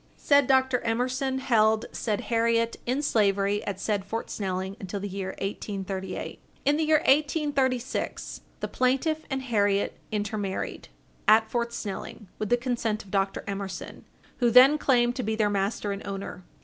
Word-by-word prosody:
Said 285 -2 +4
Dr. 260 -1 +3
Emerson 255 +4 -1
held 220 -4 +3
said 210 -3 -2
Harriet 230 0 +1
in 260 +4 0
slavery 205 -4 +2
at 195 -2 -4
said 205 -1 -1
Fort 225 +4 -5
Snelling 190 -1 -3
until 195 -1 -5
the 200 - -4
year 190 -1 -5
1838. 195 -1 -4 0.3
In 290 +2 +3
the 315 - +1
year 310 -1 +4
1836, 275 -3 0 0.2
the - - -1
plaintiff 270 +5 +1
and 265 -1 -2
Harriet 205 -5 +1
intermarried, 205 -2 -3 0.4
at 220 +1 +5
Fort 235 -1 -1
Snelling, 210 -1 -6
with 215 - -2
the 245 - +4
consent 235 -3 -2
of 195 - -16
Dr. 195 -1 0
Emerson, 195 -2 -6 0.3
who 240 -2 +3
then 260 +6 +7
claimed 245 -3 +3
to - - 0
be 220 -2 -1
their 210 -2 +1
master 200 +1 -1
and 200 0 -4
owner. 195 -2 -6
220 Hz, 155 wpm, -27 LUFS, 200-255 Hz, 0.4 s, then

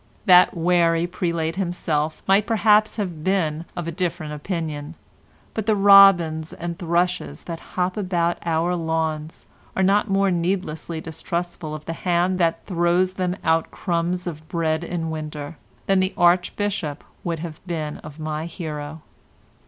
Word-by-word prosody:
That 180 -1 +6
wary 170 -1 +3
prelate 170 -2 -2
himself 160 -4 -1
might 195 +2 +4
perhaps 215 -1 +4
have 180 -8 -4
been 165 -4 0
of 175 -1 -3
a - - -2
different 170 -3 -3
opinion, 155 -1 -4 0.6
but 220 -1 -3
the 215 - +4
robins 195 -6 +6
and 170 0 -5
thrushes 175 +1 -1
that 165 -1 -6 0.2
hop 180 +1 0
about 175 -4 0
our 170 +1 +1
lawns 160 -2 -2 0.3
are 190 - +2
not 200 +3 +3
more 195 0 +2
needlessly 170 -2 -2
distrustful 165 -1 -4
of 155 0 -9
the 165 - -3
hand 180 +2 0
that 165 -2 +1
throws 180 0 +1
them 185 -1 -1
out 160 0 +2
crumbs 175 0 -2
of 155 -2 -7
bread 160 -1 0
in 165 -2 -3
winter, 155 -1 -6 0.3
than 195 -1 +3
the 185 +1 0
Archbishop 175 -2 +1 0.2
would 170 -1 -2
have 160 -1 -8
been 155 -3 -3
of 150 -1 -11
my 155 0 -4
hero. 155 -3 -6
170 Hz, 145 wpm, -23 LUFS, 160-185 Hz, 0.6 s, That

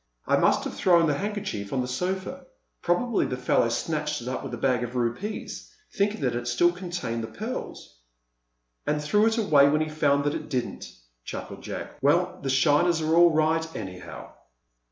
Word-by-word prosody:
"I - - +3
must - - +3
have - - -4
thrown 170 -3 +4
the 150 - +2
handkerchief 200 - -4
on 130 - 0
the 125 - -3
sofa. 190 - -3 0.3
Probably 210 +6 +1
the 125 - -3
fellow 125 -2 +2
snatched 150 +4 -2
it - - -8
up 130 - -3
with - - -7
the 120 - -4
bag 125 0 +1
of 120 +1 -6
rupees, 125 - -3 0.2
thinking 200 -2 0
that 125 -3 0
it 120 0 -3
still 175 +8 +3
contained 175 -10 -4
the - - -4
pearls." - - -7 0.9
"And 150 0 +1
threw 210 +9 +3
it 225 0 +1
away 145 -10 +5
when 155 +2 +2
he 155 - -1
found 145 -2 +2
that 145 0 0
it - - -5
didn't," 130 -4 -3 0.3
chuckled - - -7
Jack. - - -7
"Well, - - +2
the 135 - -3
shiners 150 +5 +3
are 155 +1 +1
all 175 0 +7
right, 160 0 +2
anyhow!" 95 -3 -8
150 Hz, 185 wpm, -26 LUFS, 125-175 Hz, 0.9 s, all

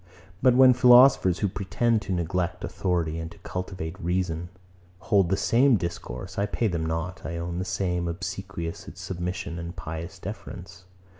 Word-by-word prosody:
But 125 -1 +5
when 130 0 +8
philosophers, 125 -7 +6
who 105 - +3
pretend 110 +4 0
to 95 - -6
neglect 90 0 -1
authority, 85 -4 -1
and 80 0 -5
to 95 - -15
cultivate 90 -3 -5
reason, 85 -1 -1 0.5
hold 95 -2 +2
the 95 - +2
same 125 0 +4
discourse, 85 +2 -5
I 100 - +1
pay 115 +2 0
them 85 -4 -2
not, 80 +3 -3
I 85 - -4
own, 85 +1 -3
the 95 - -2
same 90 -2 -1
obsequious 85 0 -5
submission 90 -1 -4
and 85 +2 -6
pious 80 0 -6
deference. 90 0 -8
90 Hz, 155 wpm, -26 LUFS, 85-100 Hz, 0.5 s, when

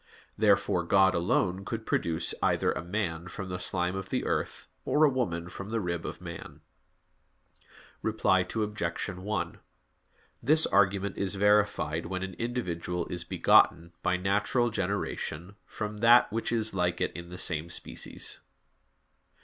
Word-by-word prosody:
Therefore - - +3
God 95 -1 +4
alone 90 +2 +1
could 110 +2 -5
produce 85 0 0
either - - +2
a - - -4
man 90 -3 -3
from 95 +1 -6
the 90 0 -4
slime 90 0 -1
of 95 0 -5
the - - -1
earth, - - -2 0.2
or 150 - +2
a 150 - +7
woman 90 -10 -2
from 100 +3 -8
the 115 +1 -1
rib 85 -4 -3
of - - -6
man. 85 -2 -9 1.4
Reply 110 -4 +2
Obj. 105 -2 -2
1: 95 +3 -3 0.8
This 155 +6 +4
argument 100 0 +2
is 100 0 -1
verified 100 -6 +2
when 95 +1 -3
an 95 -1 -5
individual 90 -8 -2
is 90 -1 -3
begotten, 85 0 +4
by 90 0 +1
natural 105 +6 +1
generation, 95 -2 -3
from 105 -1 -5
that 120 +3 +6
which 115 0 -1
is 110 -2 0
like 90 -1 0
it - - 0
in 85 0 -9
the 90 - -8
same 85 -2 -1
species. - - -5
95 Hz, 145 wpm, -29 LUFS, 90-105 Hz, 1.4 s, a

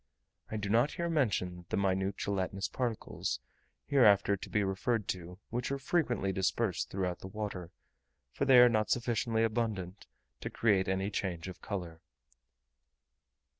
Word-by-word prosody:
I 110 - -3
do 105 -1 -3
not 120 +7 +3
here 170 0 -2
mention 90 - 0
the - - -1
minute 95 0 0
gelatinous 100 0 -2
particles, 120 -4 -3 0.5
hereafter 100 -7 +5
to 95 - -9
be 105 - +1
referred 100 +2 -1
to, 90 0 -4
which 120 +3 -2
are 140 - 0
frequently 130 - 0
dispersed 95 +1 0
throughout 90 -2 -2
the - - -8
water, 100 -4 -5 0.6
for 140 - -1
they 135 -2 +7
are 125 0 +10
not 110 -3 +1
sufficiently 115 -1 +1
abundant 105 -4 -2 0.3
to - - -4
create 100 -5 +2
any 95 +2 0
change 90 -4 -3
of 95 - -9
colour. 85 -5 -5
100 Hz, 145 wpm, -32 LUFS, 95-120 Hz, 0.6 s, are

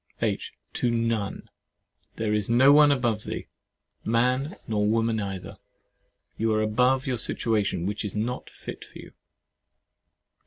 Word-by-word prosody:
H. - - -1 0.2
To 120 - 0
none; 115 -3 -1 0.7
there 110 -1 -1
is 105 -1 0
no 130 +4 +6
one 150 0 +7
above 120 -6 0
thee, - - -5 0.6
man 125 - +1
nor 105 -2 +1
woman 115 0 +1
either. 95 -2 -6 0.8
You 110 0 +1
are 110 - +2
above 125 +5 +2
your 125 -3 -1
situation, 105 -8 0
which 105 +3 -2
is 105 -1 -5
not 120 +4 -3
fit - - -9
for - - -13
you. - - -11
115 Hz, 140 wpm, -26 LUFS, 105-125 Hz, 0.8 s, one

